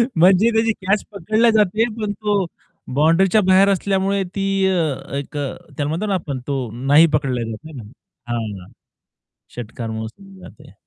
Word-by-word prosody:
म्हणजे 185 +6 +5
त्याची 225 0 +2
कॅच 200 +2 +2
पकडली 215 +5 +2
जाते. 215 +1 +2
पण 210 -1 -2
तो 205 -2 0 0.5
बाउंडरीच्या 175 +8 +4
बाहेर 190 +1 +5
असल्यामुळे 195 0 0
ती 195 0 -1 0.2
अ, 160 -6 -1
एक 145 +1 -6
अ, 140 -1 -1 0.3
त्याला 145 -1 -1
म्हणतो 170 +7 -2
ना 200 - -1
आपण 145 -7 -3
तो 140 -1 -1 0.3
नाही 150 +4 +7
पकडला 135 -5 0
जात. 110 - -5
आहे 160 - -10
ना? 115 - -8 0.5
हां, 105 -6 -4 0.9
षटकार 115 -1 -6
मोजली 155 - -8
जाते. - - -14
185 Hz, 155 wpm, -20 LUFS, 140-200 Hz, 0.9 s, नाही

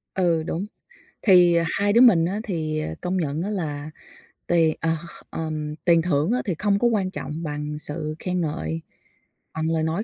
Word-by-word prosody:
Ừ, 170 -4 +2
đúng. 175 +5 -3 0.6
Thì 180 -4 +6 0.2
hai 205 +1 +1
đứa 235 - +6
mình 180 -10 +7
á 195 +5 -2
thì, 155 -7 -2
ờ, 80 - -4
công 180 +1 -1
nhận 155 -2 -1
á 195 - -2
là 155 -7 -3 0.6
tiền, 165 -2 +3
à, 165 0 0
kh - - -9 0.2
kh - - -39
ờm, 155 -2 -4
tiền 170 -2 +5
thưởng 160 +2 +1
á 250 - +1
thì 185 - -1
không 200 -1 +2
có 240 - +3
quan 200 -5 0
trọng 165 -2 -5
bằng 150 0 -4
sự 155 0 -4
khen 180 -1 -1
ngợi, 80 - -3 0.7
bằng 160 0 -1
lời 160 -1 +1
nói 165 +7 -1
165 Hz, 195 wpm, -24 LUFS, 155-185 Hz, 0.7 s, mình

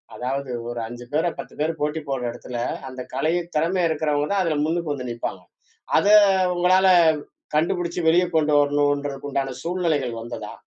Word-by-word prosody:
அதாவது 130 +3 -3 0.2
ஒரு 120 0 -4
5 120 +1 -9
பேர 155 +3 +2
10 - - -8
பேர 155 +2 +1
போட்டி 150 +2 -1
போடுற 130 -2 -2
எடத்துல, 120 0 -7 0.3
அந்த 130 0 -7
கலை 155 +6 0 0.2
திறம 165 +5 +1
இருக்கறவங்க 150 -2 0
தான் 195 - +2
அதுல 160 -4 0
முன்னுக்கு 165 -1 -1
வந்து 125 -3 -5
நிப்பாங்க. 115 - -5 0.6
அத 205 - +2 0.5
உங்களால 185 +2 +4 0.7
கண்டுபிடிச்சு 170 +2 0
வெளிய 175 +2 +5
கொண்டு 150 -1 +2
வரணும்ன்றதுக்கு 145 -1 0
உண்டான 135 -1 -2
சூழ்நிலைகள் 160 -9 -1
வந்ததா? 115 -2 -7
145 Hz, 150 wpm, -23 LUFS, 130-165 Hz, 0.7 s, வெளிய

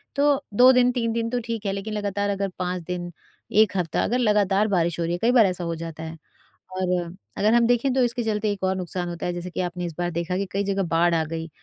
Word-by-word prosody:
तो 285 0 +2
2 255 +1 +8
दिन, 250 0 +4
3 230 -2 -1
दिन 230 0 -1
तो 245 +1 -1
ठीक 230 -2 -4
है 195 - +1
लेकिन 205 +2 -4
लगातार 205 -1 -1
अगर 195 -1 -1
5 180 -1 -2
दिन, 175 0 -5 0.4
1 215 0 +4
हफ्ता 165 -4 0
अगर 245 - 0
लगातार 210 -2 +3
बारिश 170 -4 0
हो - - +1
रही 170 - -1
है, 175 - -1
कई 235 +2 +3
बार 240 -4 +6
ऐसा 180 -2 -2
हो 170 -1 -2
जाता 165 -1 -7
है। 160 0 -7 0.6
और 185 -1 -1 0.5
अगर 215 +2 +3
हम 235 0 +5
देखें 245 +2 +2
तो 265 - +2
इसके 240 0 -1
चलते 215 -1 0
एक 200 -2 -6
और 190 0 +1
नुकसान 180 -1 -4
होता 170 0 -5
है 175 - -1
जैसे 175 +1 -5
कि 180 - -3
आपने 180 0 -3
इस 170 - -5
बार 175 0 -1
देखा 170 +2 -2
कि 200 - -1
कई 200 +1 0
जगह 200 0 0
बाढ़ 170 +1 +3
आ 160 - +2
गई 165 +1 -5
195 Hz, 265 wpm, -24 LUFS, 175-225 Hz, 0.6 s, 2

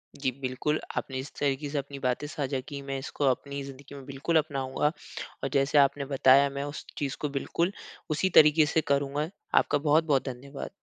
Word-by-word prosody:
जी, 140 -2 -1
बिल्कुल 135 +4 -1 0.2
आपने 130 - -3
इस 130 +1 -7
तरीक़े 145 +1 0
से 145 - -3
अपनी 140 0 -4
बातें 125 +2 -1
साझा 140 -3 -2
की 140 -2 -6
मैं 135 0 -4
इसको 140 +1 -3
अपनी 140 +2 -4
ज़िंदगी 140 +1 -10
में 135 -1 -10
बिल्कुल 140 +5 0
अपनाऊँगा। 145 -1 0 0.5
और - - 0
जैसे 140 +1 +3
आपने 140 0 +4
बताया 135 0 +5
मैं 140 0 -4
उस 145 +1 -6
चीज़ 140 -2 -2
को 150 - -1
बिल्कुल 170 +6 -1 0.4
उसी 155 +5 +1
तरीक़े 150 0 +6
से 160 +2 +1
करूँगा। 140 +1 0 0.3
आपका - - +4
बहुत-बहुत 150 -1 +2
धन्यवाद। 135 +3 -7
140 Hz, 185 wpm, -28 LUFS, 135-150 Hz, 0.5 s, तरीक़े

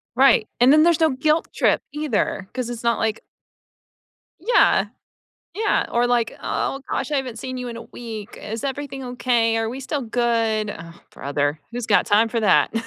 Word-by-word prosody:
Right, 265 -5 +5
and 250 +2 +6
then 305 +1 +6
there's 340 -1 +3
no 320 -1 +4
guilt 305 +5 +1
trip - - +2
either, 275 -9 -1
'cause 250 -2 -3
it's 240 -1 -6
not 235 0 +1
like 220 0 -1 1.2
Yeah, 475 +8 +4 0.7
yeah, 430 +1 +1
or 240 +1 +2
like, 240 -2 0
"Oh 270 - -2
gosh, - - -2
I 290 - +2
haven't 250 -4 -4
seen 255 +2 -5
you 250 -1 -5
in 235 - -6
a 230 - -7
week 220 -4 -9
is 220 +1 -5
everything 275 -1 -4
okay? 240 -2 +1
Are 225 0 -1
we 255 +3 -6
still 275 +1 -3
good?" 225 -2 0
Ugh, 165 -4 -9 0.2
brother, 145 +2 -2
who's 240 -1 -4
got 210 - +4
time 220 +2 +3
for 230 - -1
that? 210 0 +3
240 Hz, 180 wpm, -22 LUFS, 225-270 Hz, 1.2 s, and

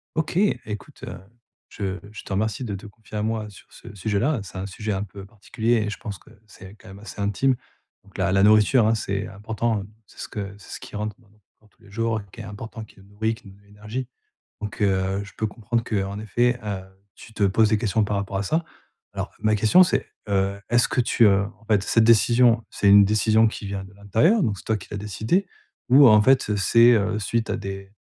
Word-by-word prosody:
OK, 160 +1 -2
écoute, 110 - -2
heu, - - -8 0.5
je 95 -1 -4
je 105 - -9
te 100 - -7
remercie 110 +4 -1
de 105 -4 -4
te 100 +3 -8
confier 110 +1 -11
à - - -1
moi 110 -1 -2
sur 100 - -16
ce 100 - -12
sujet-là. 110 +7 0
C'est 95 -1 -9
un 95 - -4
sujet 105 +2 -4
un 100 +1 -2
peu 100 0 -11
particulier 110 +3 -2
et - - -2
je - - -6
pense 100 -3 -7
que - - -21 0.2
c'est 100 -1 -13
quand 100 - -17
même 95 +1 -11
assez 105 0 -9
intime. 105 +7 +1 0.5
Donc 100 - -16
la 95 0 +1
la 95 0 +4
nourriture, 110 +3 +5
hein, 115 - +3
c'est 100 -1 -3
important, 110 +2 -2
heu, 100 - -9 0.2
c'est - - -21
ce - - -6
que 100 -2 -6
c'est 100 - -13
ce - - -8
qui - - -9
rentre 105 0 -4
dans 110 - -25
notre 105 -1 -29 0.2
corps 105 - -25
tous - - -31
les 100 - -18
jours, 115 0 -1
qui 115 - -11
est - - -6
important 110 +2 -8
qui 100 - -20
nous 95 - -18
nourrit, 110 +3 -2
qui 110 - -17
nous 95 - -12
donne 100 - -23
de - - -26
l'énergie. 105 +5 -6 0.5
Donc, 105 0 -6
heu, 95 0 +1
je 100 - -12
peux 110 - 0
comprendre 115 +2 -2
qu'en 100 -1 -2
effet, 120 +3 +1
heu, 100 -3 -3 0.3
tu 110 - -14
te 105 - -1
poses 105 +2 +3
des 110 - +3
questions 110 -1 +1
par 105 0 -1
rapport 100 0 -3
à 100 - -1
ça. 160 +10 0 0.5
Alors - - -4
ma 110 0 +2
question 110 - +5
c'est, 180 - 0 0.2
heu, 100 0 0
est-ce 120 0 +3
que 125 - +1
tu, 115 -1 +3
heu, 100 0 +4
en 115 - -22
fait 105 -3 +2
cette 115 - +3
décision, 115 +1 +4
c'est 100 - -1
une 100 0 +8
décision 110 +2 +3
qui 110 - -5
vient 100 -1 -4
de 95 +1 -14
l'intérieur? 115 - +2
Donc 100 -3 -1
c'est - - -14
toi 110 -1 +1
qui 95 - -13
l'a 105 - -4
décidé. 110 - -1 0.4
Ou, 135 +1 +8
en 105 -1 +7
fait, 125 -3 +3
c'est, 115 +4 +5
heu, 105 0 +1
suite 115 +2 -1
à 105 - -1
des 95 -1 -7
105 Hz, 240 wpm, -24 LUFS, 100-115 Hz, 0.5 s, une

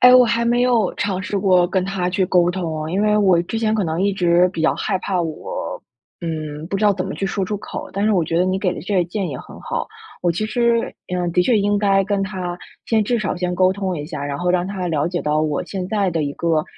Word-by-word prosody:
哎， 250 0 +8
我 250 -1 +8
还 235 0 +1
没 240 +1 +2
有 245 -3 +2
尝 190 -2 -1
试 200 +1 -2
过 185 -2 +4
跟 185 0 0
他 185 -2 -1
去 185 0 +1
沟 175 -1 +3
通， 160 -4 -3
因 190 - 0
为 210 0 +3
我 190 -5 +4
之 225 +6 -4
前 220 -1 +1
可 205 -4 +1
能 160 +1 -2
一 200 0 +2
直 180 -1 +3
比 165 - -4
较 160 - +3
害 195 -3 -1
怕 185 -1 -1
我， - - -5 0.4
嗯， 155 -2 -4
不 195 - -2
知 210 - 0
道 205 - +6
怎 185 0 -3
么 - - -4
去 195 - -3
说 195 0 -1
出 205 +3 -3
口， - - -7
但 200 +2 -1
是 215 - +3
我 175 -4 +2
觉 165 - -2
得 180 - +3
你 185 +1 0
给 185 -2 0
的 - - -6
这 200 +1 -2
个 175 - +3
建 190 -1 -2
议 135 - -4
很 - - -11
好。 - - -3 0.3
我 175 - +2
其 180 +6 -1
实 235 +1 +1 0.2
嗯， 175 -1 -1
的 180 - +3
确 235 +3 +3
应 205 0 +2
该 195 -1 +3
跟 200 0 -1
他 180 -3 -4 0.3
先 220 -2 +2
至 240 +3 0
少 190 -3 -2
先 180 0 -1
沟 185 +1 +4
通 190 -3 -2
一 145 - -4
下， 150 -3 -5
然 140 -1 -3
后 180 0 0
让 180 0 +1
他 190 -3 -3
了 150 -2 0
解 175 0 -2
到 150 +1 +1
我 150 -2 -1
现 185 -2 -4
在 200 -2 0
的 160 -2 -1
一 140 - -3
个， 160 -2 0
185 Hz, 295 characters per minute, -20 LUFS, 175-205 Hz, 0.4 s, 哎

